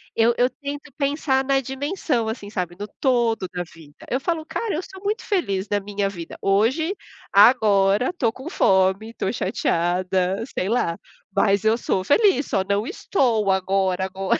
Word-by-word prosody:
Eu 230 +1 +4
eu 250 +1 +4
tento 285 +2 -7
pensar 280 -2 0
na 270 0 +2
dimensão 270 - -2
assim, 220 -2 -5
sabe? 180 -4 -4
No 205 - -4
todo 235 -7 +1
da 180 - -2
vida. 155 -3 -15 0.2
Eu 255 - 0
falo 325 +2 -2
cara, 360 +7 -3
eu 320 - -1
sou 380 +1 -12
muito 425 +3 -1
feliz 200 - -1
na 205 - +1
minha 200 0 -2
vida. 170 -4 -8
Hoje 250 - +1 0.4
agora 205 0 +5
estou 255 -11 -1
com 265 +6 -8
fome, 190 - +2
estou 195 - -2
chateada, 185 -2 0
sei 185 - 0
lá, 200 -7 0 0.4
mas 200 -1 +3
eu 220 +1 +3
sou 190 -5 -1
feliz. 360 - +3
Só 190 - 0
não 205 +3 0
estou 225 - +1
agora 190 -1 +1
agora. 190 0 -1
220 Hz, 165 wpm, -23 LUFS, 195-275 Hz, 0.4 s, agora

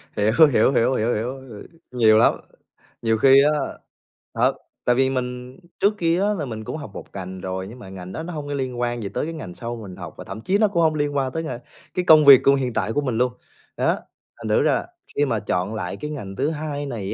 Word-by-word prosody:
Hiểu, 105 +1 +2 0.2
hiểu, 115 +3 +4
hiểu, 130 +1 +2
hiểu, 115 +3 +1
hiểu, 120 +5 -2
h 130 -3 -14
ừm, 105 - -10 0.3
nhiều 110 -3 +5
lắm. 115 - +5 0.7
Nhiều 115 -1 +1
khi 135 +3 +6
á, 150 - +4 0.8
thật, - - +2 0.3
tại 120 - +3
vì 130 0 +3
mình 125 +1 -4 0.2
trước 205 +2 +3
kia 170 0 +1
á 210 +1 +2
là 160 -8 -3
mình 110 -3 -6
cũng 130 - -5
học 145 - -8
một - - -8
ngành 95 -1 -7
rồi, 95 +1 -4
nhưng 120 +4 -11
mà 95 - -11
ngành 95 -1 -9
đó 160 - -5
nó 175 - -6
hông 150 -2 -5
có 145 - -3
liên 130 -3 -3
quan 120 -2 -2
gì 100 - -4
tới - - -2
cái 165 - -5
ngành 125 - -7
sau 120 +4 -5
mà 115 - -9
mình 90 - -9
học, - - -8
và - - -8
thậm 110 - -8
chí 190 - +1
nó 215 0 +4
cũng 170 -4 0
hông 155 -1 +2
liên 145 -1 -1
quan 135 -2 0
tới 165 0 -3
ng - - -5 0.4
cái 180 - -1
công 155 -2 +7
việc 140 -2 +10
của 140 - +6
hiện 130 -3 -2
tại 110 +1 -1
của 145 - +1
mình 125 -5 -2
luôn. 125 0 +1 0.4
Đó, - - +1 0.4
thành - - -7
thử - - +3
ra - - +3
là - - -2 0.3
khi 145 - +2
mà 115 -6 -1
chọn 95 +1 -2
lại 90 -5 -4
cái 150 0 -5
ngành 100 -10 -6
thứ 140 +8 0
hai 150 -2 -4
này 110 -7 -4
125 Hz, 265 wpm, -22 LUFS, 110-145 Hz, 0.8 s, việc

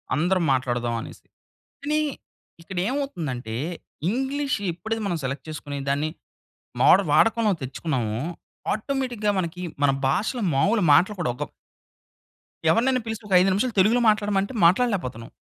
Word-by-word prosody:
అందరం 180 +3 +1
మాట్లాడదామనేసి. 120 -3 -2 0.6
కానీ, 300 +1 +1 0.6
ఇక్కడేమవుతుందంటే 175 - -3 0.6
ఇంగ్లీష్ 270 +4 -1
ఎప్పుడది 220 +6 -4
మనం 175 - 0
సెలెక్ట్ 135 +3 -4
చేసుకొని 145 -2 -5
దాన్ని 145 +3 +1 0.7
మోడల్ - - +6
వాడకంలో 225 -2 +4
తెచ్చుకున్నామో, 125 -5 -2 0.5
ఆటోమేటిక్‌గా 240 -3 -1
మనకి 180 0 -3 0.2
మన 140 - +5 0.2
భాషలో 225 - 0
మావులు 205 +10 +2
మాటలు 185 +8 +4
కూడా 155 - 0
ఒక - - -2 1.3
ఎవరినైనా 255 +6 +2
పిలిచి 220 -1 -5
ఒక 195 - -2
5 190 +2 +4
నిమిషాలు 230 +4 0
తెలుగులో 225 +6 +4
మాట్లాడమంటే 205 0 +1
మాట్లాడలేపోతున్నాం. 175 - +1
190 Hz, 115 wpm, -24 LUFS, 145-230 Hz, 1.3 s, మోడల్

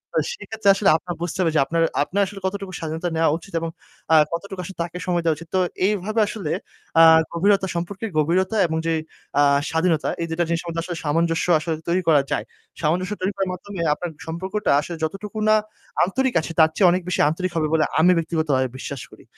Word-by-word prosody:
তো - - +4 0.2
সেক্ষেত্রে 220 - -1
আসলে 200 0 +3
আপনার 175 +1 -6
বুঝতে 175 +1 -3
হবে 165 -3 +2
যে - - +5
আপনার 165 +3 0 0.2
আপনার 200 +6 -1
আসলে 195 +1 -8
কতটুকু 195 0 -3
স্বাধীনতা 160 +1 -3
নেওয়া 160 0 +3
উচিত 170 +2 -15
এবং 165 - -2 0.4
আ - - +8 0.2
কতটুকু 190 +2 -5
আসলে 190 +2 -9
তাকে 175 +1 -7
সময় 175 -1 +1
দেওয়া 160 -2 +2
উচিত। 165 +2 -11
তো 185 - +4 0.3
এইভাবে 210 +2 0
আসলে 195 -8 -4 0.5
আ - - +9 0.3
গভীরতা 195 +3 +2
সম্পর্কের 190 +6 -4
গভীরতা 185 +7 +1
এবং 160 0 -2
যে 165 - +2 0.5
আ - - +6 0.3
স্বাধীনতা 160 -1 +1
এই - - 0
২ 165 - -4
টা - - +4
জিনিসের 170 +1 -2
মধ্যে 165 0 -2
আসলে 175 -1 -5
সামঞ্জস্য 165 +2 +1
আসলে 160 +1 -2
তৈরি 180 +2 +2
করা 150 -3 +6
যায়। - - -1 0.4
সামঞ্জস্য 180 +6 0
তৈরি 190 +2 0
করার 195 -1 -1
মাধ্যমে 190 +1 -8
আপনার 175 +3 -5 0.2
সম্পর্কটা 190 +6 -2
আসলে 170 +2 -6
যতটুকু 195 +7 -4
না 215 - +6 0.5
আন্তরিক 260 +7 0
আছে 160 - -6
তার 160 - +7
চেয়ে 190 - +5
অনেক 180 +1 +1
বেশি 180 - +1
আন্তরিক 180 +4 -2
হবে 155 -1 +1
বলে 160 -1 +4 0.2
আমি 175 +3 +6
ব্যক্তিগতভাবে 155 -5 0
বিশ্বাস 135 0 -6
করি। - - -16
175 Hz, 205 wpm, -22 LUFS, 160-195 Hz, 0.5 s, আ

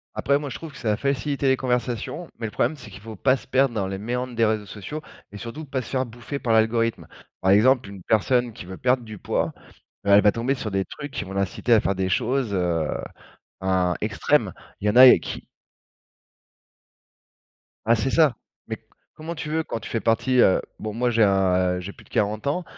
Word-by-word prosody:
Après, 140 0 +2
moi 145 -1 -5
je - - -6
trouve 165 -2 -9
que 140 - -13
ça 115 -5 -1
a - - -2
facilité 140 +1 -1
les 130 0 +4
conversations, 125 +6 -2
mais 115 - -4
le 110 - -4
problème 155 - 0
c'est 125 -4 -12
qu'il - - -11
faut 110 0 -9
pas 130 +6 +3
se - - -11
perdre 135 -1 +2
dans 100 -4 -1
les 95 0 -4
méandres 125 +4 -3
des 115 0 +3
réseaux 105 -1 -1
sociaux 110 +11 -7 0.3
et 105 - -9
surtout 120 +9 -7
pas 135 -2 -3
se 120 - -10
faire 130 -1 0
bouffer 120 +4 -7
par 125 -5 0
l'algorithme. 115 +1 +1 0.3
Par 95 - +1
exemple, 115 +3 +4
une 100 -2 -11
personne 120 +4 +1
qui 110 - -10
veut 95 +1 -8
perdre 125 0 +1
du 110 -2 -9
poids, - - -1 0.5
heu, - - +2
elle 100 +1 +7
va 105 - +5
tomber 120 +4 0
sur 115 -5 -5
des 95 -1 -1
trucs 145 -1 -8
qui - - -4
vont 95 - -8
l'inciter 100 +5 +1
à 110 - +5
faire 100 - 0
des 95 0 -1
choses, 120 +3 0
heu, 85 -4 0 0.7
im 95 -2 +1
extrême. - - +1 0.3
Il 105 - -2
y - - +5
en 105 - 0
a 130 0 +10
qui - - -7 2.4
Ah 115 +1 +5
c'est 130 +5 -1
ça. 155 -6 +4 0.3
Mais - - -4
c - - -35 0.3
comment 160 +2 -7
tu 150 -1 -5
veux 160 +1 0
quand 115 - -5
tu - - -8
fais 115 - -1
partie, 120 +3 +2
heu 95 - +5 0.2
bon, 110 -1 -5
moi 120 +3 0
j'ai 115 -1 +4
un 95 -2 +3
a 90 0 +1
j'ai 95 +2 -6
plus - - -18
de - - -24
40 105 +5 -1
ans, 180 +6 0
115 Hz, 230 wpm, -24 LUFS, 100-130 Hz, 2.4 s, a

